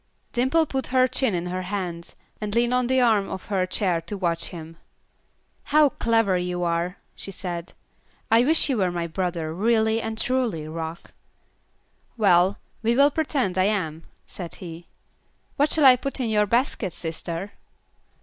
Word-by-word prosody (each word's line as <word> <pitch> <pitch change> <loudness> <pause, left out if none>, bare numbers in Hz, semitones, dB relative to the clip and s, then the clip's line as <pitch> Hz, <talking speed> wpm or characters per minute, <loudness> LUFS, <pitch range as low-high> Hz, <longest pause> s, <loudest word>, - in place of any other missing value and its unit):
Dimple 260 +7 +2
put 265 -3 -3
her 255 0 +3
chin 250 -4 0
in 170 0 -2
her 180 +1 -3
hands, 180 -3 -5 0.3
and 210 0 -3
leaned 240 +1 +2
on 250 -1 +2
the 260 +1 +2
arm 220 -5 +3
of 190 - -6
her 190 -3 +1
chair 185 -3 0
to 205 +5 -6
watch 170 -3 -1
him. 165 -1 -9 0.9
"How 300 0 +5
clever 225 -7 +1
you 180 0 -2
are," 170 +2 -1 0.2
she - - -8
said, 175 -3 -5 0.6
"I 230 +2 +6
wish 315 +4 +3
you 265 -4 0
were 185 -3 +2
my 175 -1 -2
brother, 170 -2 -3
really 220 +3 +2
and 220 0 -4
truly, 230 -11 0
Rock." 160 +1 -6 1.1
"Well, 190 -2 +4 0.2
we 230 +1 +2
will 280 +3 +5
pretend 275 - -1
I 185 - +4
am," 165 -6 -1 0.2
said 175 -3 -7
he. 170 -1 -9 0.7
"What 290 +2 +2
shall 305 -3 +3
I 255 -1 +9
put 275 +2 -4
in 245 -3 -1
your 210 -1 +2
basket, 230 - 0
sister?" 170 +3 -5
200 Hz, 165 wpm, -24 LUFS, 175-240 Hz, 1.1 s, I